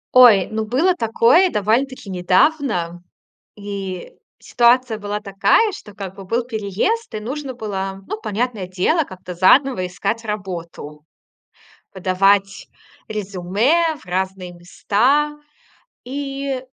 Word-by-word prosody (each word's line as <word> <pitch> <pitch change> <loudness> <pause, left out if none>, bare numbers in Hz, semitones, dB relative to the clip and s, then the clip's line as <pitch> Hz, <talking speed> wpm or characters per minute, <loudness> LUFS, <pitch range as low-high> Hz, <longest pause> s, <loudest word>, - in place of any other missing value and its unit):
Ой, 225 -7 +7
ну 220 0 -1
было 310 - +2
такое 235 +9 +4
довольно-таки 230 - 0
недавно, 185 - +1 0.6
и 195 -3 -6 0.3
ситуация 240 -1 +2
была 205 0 -4
такая, 210 - +2
что, 210 - -10
как 195 -2 -7
бы, 195 - -10
был 230 +5 -1
переезд, 230 - -2
и - - -2
нужно 265 +3 -5
было, 195 -4 -4
ну, - - -4
понятное 215 -2 -3
дело, 190 - +1
как-то 185 -7 -9
заново 185 +2 +3
искать 205 +5 -3
работу. 170 -7 -6 0.9
Подавать 195 +2 +1 0.4
резюме 215 - 0
в - - -18
разные 185 0 -3
места. 255 +12 0 0.7
И 275 0 -4
210 Hz, 110 wpm, -20 LUFS, 190-255 Hz, 0.9 s, Ой